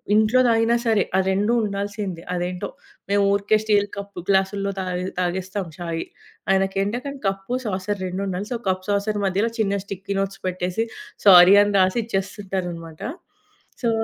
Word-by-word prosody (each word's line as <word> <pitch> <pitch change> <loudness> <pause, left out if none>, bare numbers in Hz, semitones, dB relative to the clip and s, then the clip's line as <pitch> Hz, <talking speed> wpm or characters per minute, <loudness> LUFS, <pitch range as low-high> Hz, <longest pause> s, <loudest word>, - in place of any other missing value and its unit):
ఇంట్లో 220 +4 +4
తాగినా 230 +1 +3
సరే, 215 -3 +4
ఆ - - +4
2 205 +5 +1
ఉండాల్సిందే. 200 -3 -4
అదేంటో 180 +1 -3 0.4
మేము 200 0 +3
ఊరికే 205 +2 +2
స్టీలు 205 -2 +2
కప్పు 200 -3 -7
గ్లాసులో 195 +1 +1
తాగే 180 0 -3 0.2
తాగేస్తాం 185 +1 -2
ఛాయి, 165 -2 -3 0.5
ఆయనకేంటంటే, 195 +7 0 0.2
cup, 195 +4 -3
saucer 195 0 -2
రెండుండాలి. 190 +2 -3
So, - - -1
cup 185 0 -1
saucer 205 +1 0
మధ్యలో 200 +5 +1
చిన్న 200 -2 +1
స్టిక్కీ 200 0 -5
నోట్స్ 195 0 -4
పెట్టేసి, 185 +4 -1 0.4
సారీ 185 +1 +10
అని 205 0 -1
రాసి 185 +5 +3
ఇచ్చేస్తుంటనన్నమాట. 185 -5 -4 0.8
సో 235 - +3
195 Hz, 135 wpm, -23 LUFS, 185-205 Hz, 0.8 s, సారీ